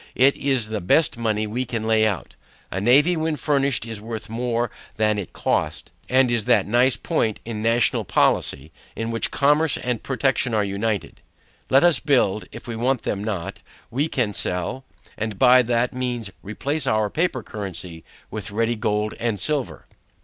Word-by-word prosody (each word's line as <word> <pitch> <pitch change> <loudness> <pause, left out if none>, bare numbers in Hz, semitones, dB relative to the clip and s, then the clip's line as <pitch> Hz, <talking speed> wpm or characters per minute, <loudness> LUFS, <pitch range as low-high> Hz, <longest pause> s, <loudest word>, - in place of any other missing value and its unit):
It 135 +2 +5
is 130 -6 0
the 110 -2 -3
best 145 - +3
money 110 -2 -1
we 115 +5 -2
can 115 -3 -4
lay 110 -1 +3
out. 100 -4 -4 0.4
A 95 - -2
navy 145 - +5
when 160 -1 -1
finished 140 -5 +1
is 115 -3 -6
worth 110 0 -6
more 120 0 -1 0.2
than 105 -1 +1
it 95 - -6
cost. - - -2 0.2
And 130 -1 +4
is 115 -3 0
that - - +4
nice 120 +4 +3
point 115 -10 -1
in 110 -2 -4
national 115 +1 +2
policy, 70 +4 +1 0.2
in 115 0 -3
which 115 - 0
commerce 150 +2 +2
and 125 -3 -2
protection 135 -3 0
are 105 - +2
united. 100 +1 -3 0.5
Let 135 +3 +5
us 175 -2 +4
build; 125 -9 +2
if 115 - -10
we 120 - -4
want 125 +2 0
them 100 0 -2
not, 100 -6 -4 0.3
we 140 +6 0
can 120 -9 -1
sell; 90 +9 -3 0.3
and 110 -2 -3
by 125 +1 +7
that 120 +1 0
means 120 -5 -3
replace 140 +9 -2
our 110 -1 +1
paper 160 -7 0
currency 90 -5 -7 0.3
with - - -5
ready 115 +3 0
gold 105 0 -1
and 115 -4 -1
silver. 145 +3 -2
115 Hz, 170 wpm, -23 LUFS, 105-130 Hz, 0.5 s, by